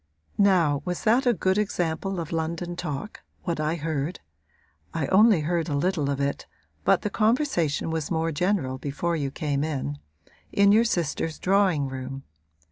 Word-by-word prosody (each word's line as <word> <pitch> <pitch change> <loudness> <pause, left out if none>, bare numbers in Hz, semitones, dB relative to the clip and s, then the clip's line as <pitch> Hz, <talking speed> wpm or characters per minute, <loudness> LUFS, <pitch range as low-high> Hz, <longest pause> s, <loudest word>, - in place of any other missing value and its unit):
'Now 175 -8 +3
was 180 +1 -3
that 245 +4 +3
a 245 - +5
good 190 +3 +1
example 190 -1 -1
of 165 -2 -5
London 170 +2 -2
talk 175 +4 -5 0.2
what 170 -3 -2
I 155 +2 0
heard 155 0 -3 0.8
(I 160 -4 0
only 205 -2 +5
heard 170 +2 -1
a 145 - 0
little 155 -2 0
of 140 -1 -1
it, 140 0 -2 0.4
but - - +3
the 210 - -2
conversation 215 - +1
was 160 -2 -2
more 165 -1 0
general 155 -5 0
before 160 +5 -2
you 145 -4 -1
came 145 0 -2
in) 130 - -3 0.5
in 200 0 +5
your 225 +3 +5
sister's 165 -5 -1
drawing 185 -7 +2
room? 135 +1 -6
165 Hz, 160 wpm, -26 LUFS, 145-190 Hz, 0.8 s, a